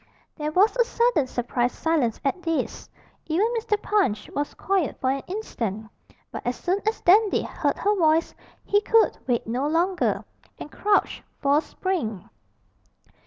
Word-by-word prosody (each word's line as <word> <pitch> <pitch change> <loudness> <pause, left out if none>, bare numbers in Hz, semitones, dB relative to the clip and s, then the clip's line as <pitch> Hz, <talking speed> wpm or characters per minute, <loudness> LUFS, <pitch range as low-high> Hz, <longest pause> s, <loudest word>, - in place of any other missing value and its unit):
There 300 -1 -3
was 395 +8 +4
a 480 - +5
sudden 465 - +1
surprised 245 0 -1
silence 300 -9 0
at 280 +7 0
this 330 -2 -3 0.4
even 335 +6 +2
Mr. 440 -2 0
Punch 395 - 0
was 290 0 -3
quiet 380 -6 -1
for 260 - +1
an 275 0 -2
instant; 225 - -4 0.4
but - - -6
as 245 +1 -1
soon 365 +8 -1
as 440 - 0
Dandy 410 +3 +4
heard - - -2
her 415 +1 +1
voice 325 -2 +2 0.3
he 410 0 +3
could 450 +1 +3
wait 240 -2 0
no 250 +5 -1
longer, 345 +4 0 0.3
and 300 - -9
crouched 415 0 +1 0.2
for 280 0 +3
a - - +3
spring. 290 - -3
330 Hz, 155 wpm, -24 LUFS, 265-405 Hz, 0.4 s, a